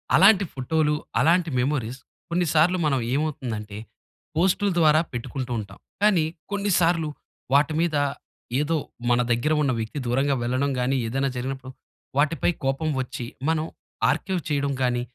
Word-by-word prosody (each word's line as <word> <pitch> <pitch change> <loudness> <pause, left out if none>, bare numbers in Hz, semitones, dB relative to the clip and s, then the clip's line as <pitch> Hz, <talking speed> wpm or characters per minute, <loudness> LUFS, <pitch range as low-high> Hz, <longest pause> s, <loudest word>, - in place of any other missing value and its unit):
అలాంటి 200 -3 +6
ఫోటోలు, 150 +3 +1 0.3
అలాంటి 170 +1 +3
మెమోరీస్ 130 -2 -1 0.3
కొన్ని 175 +1 +1
సార్లు 165 +4 +4
మనం 140 -3 +2
ఏమవుతుందంటే, 120 -8 -3 0.6
పోస్టులు 190 +3 +2
ద్వారా 155 -2 +5
పెట్టుకుంటూ 125 +1 -5
ఉంటాం. 100 -2 -9 0.2
కానీ, 200 -6 +4 0.3
కొన్నిసార్లు 175 -5 +2 0.5
వాటి 145 +2 +4
మీద 165 -2 +1 0.6
ఏదో 155 +2 +1 0.3
మన 120 0 +4
దగ్గర 120 +7 +2
ఉన్న 135 - +2
వ్యక్తి 110 +6 -4
దూరంగా 135 +3 +2
వెళ్లడం 130 +3 0
గాని, 130 +2 +1
ఏదైనా 135 +4 0
జరిగినప్పుడు 130 +1 -4 0.5
వాటిపై 155 +4 +2
కోపం 135 +4 0
వచ్చి, 130 -1 -5 0.2
మనం 160 -1 +1 0.4
ఆర్కైవ్ 190 -3 -1
చేయడం 140 -1 0
గాని, 120 -1 +1
145 Hz, 130 wpm, -25 LUFS, 130-165 Hz, 0.6 s, అలాంటి